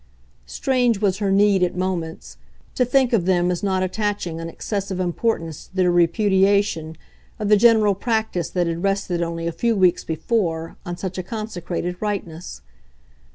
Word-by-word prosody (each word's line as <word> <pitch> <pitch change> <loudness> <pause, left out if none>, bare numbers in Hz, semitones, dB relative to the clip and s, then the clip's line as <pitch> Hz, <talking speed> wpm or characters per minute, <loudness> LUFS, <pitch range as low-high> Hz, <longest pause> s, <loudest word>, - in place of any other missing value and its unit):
Strange 245 - +1
was 195 -2 +1
her 200 -2 0
need, 200 -1 +4
at 180 -1 +1
moments, 180 -3 -4 0.4
to 250 - +2
think 250 0 +2
of 185 -6 +2
them 180 -1 +2
as 175 - -2
not 190 -2 0
attaching 185 -4 -2
an 165 - -5
excessive 195 +1 -4
importance 175 -3 -2
to - - -25
their 185 -2 +3
repudiation 190 -1 +2 0.4
of 210 -1 -2
the 210 - +7
general 215 -1 +5
practice 220 -5 -1
that 180 -1 0
had 170 0 -2
rested 195 -3 0
only 165 0 -3
a 170 - -1
few 230 +8 0
weeks 185 -3 +3
before 165 -1 -2
on 175 0 -4
such 185 0 -4
a - - -3
consecrated 180 -4 -4
rightness. 185 -5 -5
185 Hz, 160 wpm, -22 LUFS, 170-210 Hz, 0.4 s, the